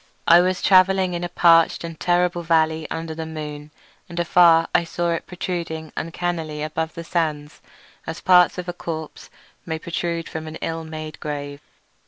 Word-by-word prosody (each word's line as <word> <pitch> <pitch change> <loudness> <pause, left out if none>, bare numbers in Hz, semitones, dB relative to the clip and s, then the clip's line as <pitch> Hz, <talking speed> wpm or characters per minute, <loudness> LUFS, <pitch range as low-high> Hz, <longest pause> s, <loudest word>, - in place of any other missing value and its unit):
I 170 +1 +8
was 185 0 -1
travelling 190 -1 +4
in 175 0 -3
a 175 - -3
parched 165 -1 +4
and 165 -2 -7
terrible 175 0 +1
valley 160 -1 +1
under 165 0 -4
the 160 0 -6
moon, 150 -2 -7 0.4
and 175 0 -5
afar 170 -1 +5
I - - +4
saw 170 +1 -2
it 165 - -3
protruding 170 -3 -5
uncannily 165 -2 -3
above 160 +1 -3
the 170 - -6
sands 155 -3 -2 0.5
as 160 - -5
parts 180 -1 +5
of 180 0 -5
a 175 - -3
corpse 160 -3 -7 0.3
may 160 -1 -3
protrude 170 0 -3
from 160 0 -6
an 155 - -7
ill 165 0 -4
made 155 -1 -7
grave. 145 -1 -5
165 Hz, 170 wpm, -22 LUFS, 160-175 Hz, 0.5 s, I